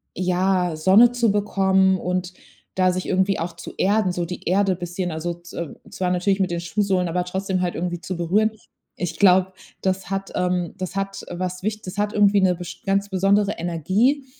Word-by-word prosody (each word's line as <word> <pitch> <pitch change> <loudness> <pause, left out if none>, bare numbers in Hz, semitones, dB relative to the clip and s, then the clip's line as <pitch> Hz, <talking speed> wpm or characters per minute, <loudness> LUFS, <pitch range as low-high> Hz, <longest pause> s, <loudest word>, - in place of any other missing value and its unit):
ja, 180 -1 +1
Sonne 190 +9 +6
zu 240 -3 +2
bekommen 190 -2 +2
und 180 +1 -2 0.4
da 185 -1 +3
sich 185 0 -3
irgendwie 190 +1 +1
auch 170 0 -4
zu 170 - -9
erden, 200 -1 +2
so 175 -1 -2
die 180 +1 -7
Erde 195 +1 +2
bisschen, 175 +1 -4
also 165 +2 -3
z 175 +1 -14 0.4
zwar 180 -1 -2
natürlich 190 +2 +1
mit 190 -1 +1
den 170 - -1
Schuhsohlen, 185 +1 0
aber 180 +2 0
trotzdem 190 0 -2
halt 180 -1 -1
irgendwie 175 0 -3
zu 185 0 -5
berühren. 195 +6 +2 0.5
Ich 165 -2 -4
glaube, 190 -1 +5 0.3
das 190 -1 -1
hat 195 0 -3
ähm, 180 -2 0
das 185 0 -5
hat 195 0 -3
was 180 +1 -4
wicht 215 +1 -3
das 185 - -7
hat 210 0 0
irgendwie 205 -1 +4
'ne 185 -1 +3
best 175 0 -9
ganz 195 +1 +1
besondere 200 +2 +2
Energie, 190 - +1
185 Hz, 190 wpm, -22 LUFS, 180-195 Hz, 0.5 s, Sonne